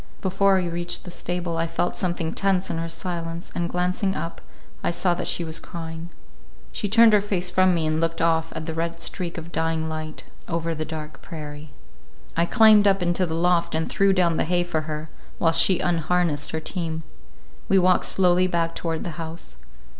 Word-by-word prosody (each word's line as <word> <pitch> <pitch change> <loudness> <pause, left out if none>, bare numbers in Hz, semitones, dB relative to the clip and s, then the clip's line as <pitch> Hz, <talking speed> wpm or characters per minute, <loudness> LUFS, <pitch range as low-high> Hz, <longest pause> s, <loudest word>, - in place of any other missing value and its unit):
Before 195 +1 +2
we 180 - -1
reached 175 +1 -2
the 180 - -9
stable, 175 -1 -3
I 165 0 0
felt 165 +2 -1
something 175 -3 -2
tense 195 -1 +1
in 165 - -2
her 165 0 -3
silence, 170 -1 -4
and 170 -1 -2
glancing 180 +2 0
up 165 - -5 0.4
I - - +1
saw 175 +1 +1
that 175 - -3
she 175 - -1
was 160 0 -4
crying. 165 -1 -7 0.6
She 205 - -2
turned 225 +1 +7
her 210 - +5
face 185 -3 -1
from 185 0 +4
me 165 -2 0
and 155 +1 0
looked 165 0 -1
off 165 -1 +1
at 160 -1 -4
the 160 - -4
red 170 +1 -3
streak 175 0 -2
of 165 +1 -7
dying 160 -1 -1
light, 155 0 -6 0.2
over 165 -1 -1
the 155 0 -3
dark 155 -2 -7
prairie. 150 -1 -8 0.7
I 170 +1 +2
climbed 215 -2 +6
up 195 -2 +3
into 175 +1 +1
the 160 - -3
loft 170 -1 +2
and 160 0 0
threw 195 0 +3
down 175 -3 +2
the - - +1
hay 175 +1 +1
for 175 -3 -1
her, 155 0 -5 0.3
while 165 - +3
she 165 +3 +5
unharnessed 165 -3 0
her 160 - -2
team. 160 -1 -4 0.7
We 195 - +5
walked 185 0 +4
slowly 180 -1 +3
back 170 -2 0
toward 165 -1 -3
the 170 0 -5
house. 160 - -7
170 Hz, 200 wpm, -24 LUFS, 160-180 Hz, 0.7 s, turned